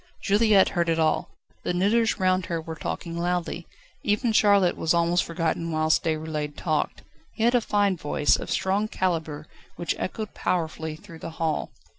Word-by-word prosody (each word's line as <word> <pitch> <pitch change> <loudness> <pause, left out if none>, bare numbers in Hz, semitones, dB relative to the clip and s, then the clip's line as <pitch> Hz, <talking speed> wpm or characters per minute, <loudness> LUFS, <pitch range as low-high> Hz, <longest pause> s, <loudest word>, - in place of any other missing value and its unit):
Juliette 205 -1 +4
heard 170 -1 0
it 165 - +2
all. 160 -1 +1 0.3
The 175 - -2
knitters 220 +5 +2
round 185 -1 +2
her 170 -1 -2
were 160 0 -6
talking 165 +1 -5
loudly. 175 0 -2 0.3
Even 215 +3 +1
Charlotte 200 -4 +4
was 165 +1 +1
almost 170 +1 +2
forgotten 165 0 -2
whilst 155 0 +2
Déroulède 155 -2 -2
talked. 155 -3 -1 0.3
He 220 - -3
had 240 +2 +4
a 245 - +4
fine 205 -3 +1
voice, 150 -1 +2
of - - -5
strong 200 +3 0
calibre, 160 -7 -2 0.3
which 175 - -1
echoed 215 +2 -4
powerfully 160 -2 -2
through 170 -1 -13
the - - -6
hall. 160 -2 -1
170 Hz, 165 wpm, -25 LUFS, 160-200 Hz, 0.3 s, Juliette